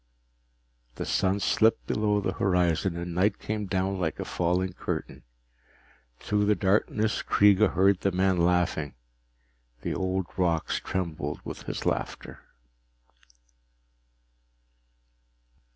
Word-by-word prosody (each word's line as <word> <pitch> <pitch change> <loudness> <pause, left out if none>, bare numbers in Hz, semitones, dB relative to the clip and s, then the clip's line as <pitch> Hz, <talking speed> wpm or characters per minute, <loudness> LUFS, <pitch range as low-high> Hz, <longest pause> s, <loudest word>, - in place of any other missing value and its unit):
The - - -4
sun 95 +1 +1
slipped 110 +2 +2
below 105 -1 +1
the 95 - -1
horizon 90 -2 +1
and 85 0 -5
night 100 +4 +2
came 105 -1 -4
down 95 0 -1
like 80 -4 -2
a - - -3
falling 90 +1 0
curtain. - - -5 1.0
Through 105 +7 0
the 105 0 +3
darkness 105 +3 +1
Kreega 105 +1 +4
heard 95 +1 +3
the 100 - +1
man 95 0 +2
laughing. 85 -5 +1 0.9
The - - -2
old 95 0 -1
rocks 85 -3 0
trembled 80 -5 -4
with - - -8
his - - -4
laughter. - - -3
95 Hz, 110 wpm, -27 LUFS, 90-100 Hz, 1.0 s, Kreega